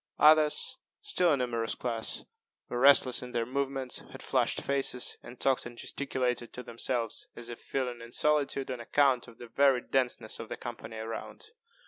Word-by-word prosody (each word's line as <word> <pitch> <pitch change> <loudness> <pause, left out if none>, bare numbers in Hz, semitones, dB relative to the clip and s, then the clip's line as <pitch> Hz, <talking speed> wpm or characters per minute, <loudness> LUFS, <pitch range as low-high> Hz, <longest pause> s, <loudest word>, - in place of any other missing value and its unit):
Others, 155 0 +4 0.2
still 180 - +3
a 145 - +3
numerous 115 -3 -1
class, 115 -2 -3 0.4
were 120 - -2
restless 135 -1 +6
in 125 -1 -8
their 115 -1 0
movements, 135 0 -2
had - - -10
flushed - - +1
faces, 135 -2 +1
and 120 +1 -12
talked 135 -2 +2
and 120 0 -12
gesticulated 125 -4 -2
to 125 - -7
themselves, 115 -1 -2
as 120 0 -7
if 120 - -8
feeling 125 -3 -3
in 115 0 -10
solitude 145 -2 +1
on 125 - -4
account 130 +1 +2
of 115 - -14
the 120 - -9
very 135 +2 +3
denseness 125 -4 -1
of 115 - -7
the - - -5
company 115 -2 -7
around. 115 - -6
125 Hz, 170 wpm, -30 LUFS, 120-135 Hz, 0.4 s, restless